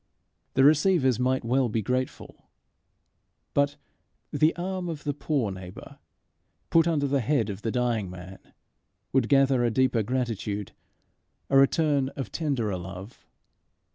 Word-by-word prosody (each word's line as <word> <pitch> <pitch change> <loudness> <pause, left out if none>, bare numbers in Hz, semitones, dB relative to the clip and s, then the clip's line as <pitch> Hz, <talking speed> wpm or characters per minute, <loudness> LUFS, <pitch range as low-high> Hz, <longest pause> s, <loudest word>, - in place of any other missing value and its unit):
The 135 - +4
receivers 150 - +4
might 130 0 0
well 125 +1 +2
be 110 0 -1
grateful; 130 +2 -4 1.0
but 140 0 +2 0.6
the 155 +1 +3
arm 180 0 -3
of 155 -3 -6
the 145 - -1
poor 140 -7 -1
neighbour 95 -1 -10 0.7
put 165 0 +4
under 155 -4 +1
the 140 0 +1
head 120 -4 0
of 100 +1 -8
the 115 - -2
dying 115 -5 -1
man, 90 +1 -10 0.7
would 130 -3 +2
gather 135 -2 +4
a 120 - +2
deeper 125 0 +2
gratitude, 110 -4 -3 0.8
a 135 - +5
return 140 -1 +2
of 135 - -5
tenderer 125 - -1
love. 95 +4 -10
130 Hz, 135 wpm, -26 LUFS, 110-145 Hz, 1.0 s, a